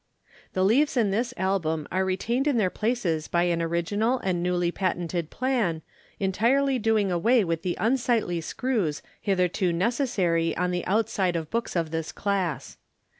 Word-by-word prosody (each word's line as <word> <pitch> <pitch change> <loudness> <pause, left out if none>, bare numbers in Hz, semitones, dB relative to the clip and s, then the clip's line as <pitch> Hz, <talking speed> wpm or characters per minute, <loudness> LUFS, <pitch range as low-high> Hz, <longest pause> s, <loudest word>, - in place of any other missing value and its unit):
The 185 - +1
leaves 270 +7 +3
in 215 -5 +3
this 235 +4 0
Album 165 -5 -1
are 185 +1 +1
retained 230 +9 0
in 280 -5 +2
their 190 -5 +2
places 205 -9 -1
by 170 0 +1
an 170 -1 +1
original 205 +9 0
and 180 -2 0
newly 175 -1 +1
patented 175 -3 -2
plan, 230 - -1 0.4
entirely 245 +8 +2
doing 215 -3 +2
away 220 +7 +3
with 165 -2 -2
the 180 -1 -2
unsightly 230 -7 +1
screws 195 - -2 0.2
hitherto 185 -1 +1
necessary 180 - 0
on 180 0 0
the 180 0 -2
outside 195 -3 +1
of 160 -2 -3
books 230 -3 -2
of 165 -3 -1
this 160 -1 -3
class. 190 -7 -2
190 Hz, 155 wpm, -26 LUFS, 170-230 Hz, 0.4 s, leaves